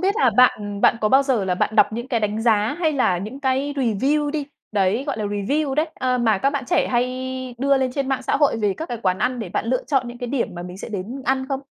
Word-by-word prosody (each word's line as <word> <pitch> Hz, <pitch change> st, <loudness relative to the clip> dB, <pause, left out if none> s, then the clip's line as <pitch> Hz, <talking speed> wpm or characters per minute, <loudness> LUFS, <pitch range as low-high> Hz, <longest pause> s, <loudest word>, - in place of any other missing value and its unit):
biết 390 Hz, +3 st, +1 dB
là 445 Hz, -, +4 dB
bạn 205 Hz, -5 st, +3 dB
bạn 230 Hz, -, +4 dB
có 215 Hz, -, +2 dB
bao 265 Hz, +4 st, +5 dB
giờ 260 Hz, -7 st, 0 dB
là 185 Hz, -1 st, 0 dB
bạn 210 Hz, +4 st, -1 dB
đọc 215 Hz, -, +5 dB
những 240 Hz, +3 st, -5 dB
cái 235 Hz, -4 st, 0 dB
đánh 210 Hz, +1 st, -1 dB
giá, 220 Hz, +2 st, +2 dB
hay 315 Hz, -3 st, +2 dB
là 195 Hz, -10 st, +1 dB
những 220 Hz, +9 st, -7 dB
cái 270 Hz, +1 st, 0 dB
review 275 Hz, +5 st, +1 dB
đi, 290 Hz, -2 st, -3 dB, 0.3 s
đấy, 205 Hz, +5 st, +1 dB
gọi -, -, -2 dB
là, 215 Hz, -, -2 dB
review 265 Hz, +9 st, -1 dB
đấy, 305 Hz, +3 st, +1 dB
ờ, 255 Hz, -1 st, 0 dB
mà 220 Hz, -4 st, +2 dB
các 275 Hz, -, +2 dB
bạn 280 Hz, -2 st, -3 dB
trẻ -, -, +2 dB
hay 240 Hz, 0 st, +2 dB, 0.5 s
đưa 275 Hz, +2 st, +3 dB
lên 260 Hz, -1 st, 0 dB
trên 275 Hz, -1 st, -2 dB
mạng 265 Hz, -1 st, -1 dB
xã -, -, +1 dB
hội 285 Hz, -5 st, +2 dB
về 205 Hz, -3 st, 0 dB
các 320 Hz, -, -5 dB
cái 240 Hz, -, -4 dB
quán 185 Hz, 0 st, +1 dB
ăn 250 Hz, +1 st, 0 dB
để 215 Hz, -6 st, -5 dB
bạn -, -, -2 dB
lựa 255 Hz, +1 st, 0 dB
chọn 265 Hz, -4 st, 0 dB
những 240 Hz, 0 st, -9 dB
cái 245 Hz, -, -4 dB
điểm 260 Hz, -3 st, -1 dB
mà 175 Hz, -, -6 dB
mình 180 Hz, +1 st, -9 dB
sẽ -, -, -7 dB
đến 220 Hz, +6 st, -5 dB
ăn 265 Hz, +1 st, 0 dB
không? 270 Hz, -1 st, -2 dB
250 Hz, 280 wpm, -22 LUFS, 210-275 Hz, 0.5 s, bao